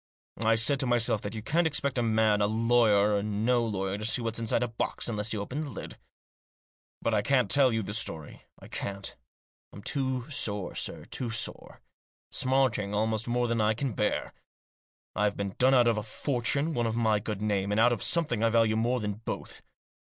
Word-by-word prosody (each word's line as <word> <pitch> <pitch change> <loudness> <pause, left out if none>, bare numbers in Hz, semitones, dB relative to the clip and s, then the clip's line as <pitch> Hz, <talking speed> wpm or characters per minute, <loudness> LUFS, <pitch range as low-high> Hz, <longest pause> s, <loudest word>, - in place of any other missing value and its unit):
I 115 0 +4
said 130 +5 +3
to 135 - +1
myself 115 -3 +2
that 100 +2 -5
you 110 - -6
can't 165 +7 +2
expect 140 -4 -1
a - - +2
man, 110 -2 +2
lawyer 105 -1 +3
or 100 - +1
no 110 +4 +1
lawyer, 100 -2 -2
to 105 - -4
see 110 - +2
what's 115 -1 -3
inside 115 +1 0
a - - 0
box 115 0 -3
unless 105 -1 -2
you 110 - -2
open 125 +9 -4
the 150 - -5
lid. 105 - -9 1.0
But 115 - +1
I 105 - +3
can't 125 -3 +1
tell 135 -3 +4
you 110 -1 -1
the 100 - -5
story; 80 -9 -5 0.2
I - - -13
can't. 100 0 -5 0.6
I'm 100 - -11
too 130 -3 -2
sore, 105 -10 -1
sir, - - -3
too 125 - -4
sore. 115 +1 -2 0.5
Smarting 130 -6 +1
almost 110 +1 0
more 120 0 +1
than 115 -1 0
I 110 0 +2
can 130 0 -2
bear. 105 - -1 0.8
I've 105 -1 0
been 100 -1 -3
done 130 +1 +5
out 120 -2 +5
of 115 -2 +2
a - - -3
fortune, 140 +7 -1
out 120 -1 0
of 110 - -2
my 110 -3 +2
good 105 -1 -5
name, 100 -2 0
and 105 +1 +1
out 120 +2 +5
of 110 - -4
something 150 -10 +2
I 115 - +4
value 115 -1 +3
more 120 +3 +1
than 105 0 -4
both. - - -5
115 Hz, 200 wpm, -28 LUFS, 105-125 Hz, 1.0 s, done